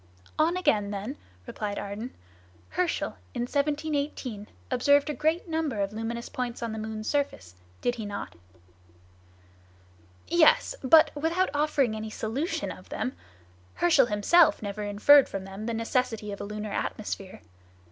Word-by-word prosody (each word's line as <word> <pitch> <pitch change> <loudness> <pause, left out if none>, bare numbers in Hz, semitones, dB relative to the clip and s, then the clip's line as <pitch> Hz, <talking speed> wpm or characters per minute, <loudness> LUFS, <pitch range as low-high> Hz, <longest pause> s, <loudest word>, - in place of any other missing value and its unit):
"On 330 +3 +3
again, 210 - +2
then," 205 +7 -4 0.3
replied 205 - -4
Ardan; 205 +5 -5 0.6
"Herschel, 360 -2 -1 0.2
in 240 - -1
1787, 285 -5 -2 0.2
observed 285 +4 +4
a - - -3
great 320 +5 0
number 320 -8 -1
of 200 +1 -1
luminous 230 +2 -4
points 245 -1 -4
on 230 - -2
the 220 - -4
moon's 215 0 -5
surface, 275 - -1 0.3
did 245 - +1
he 225 -3 -6
not?" 205 0 -5 1.9
"Yes! 340 +8 +4
but 310 +4 +7
without 330 +5 0
offering 290 -6 +1
any 215 0 -5
solution 240 - -2
of - - -12
them. 255 - -3 0.6
Herschel 315 -8 +4
himself 220 +10 +4
never 205 +1 -4
inferred 210 +8 +6
from 195 - -4
them 195 +3 -7
the 235 - -1
necessity 225 -2 -1
of 200 - -6
a - - -4
lunar 210 0 -5
atmosphere. 195 -3 -4
240 Hz, 140 wpm, -28 LUFS, 210-295 Hz, 1.9 s, but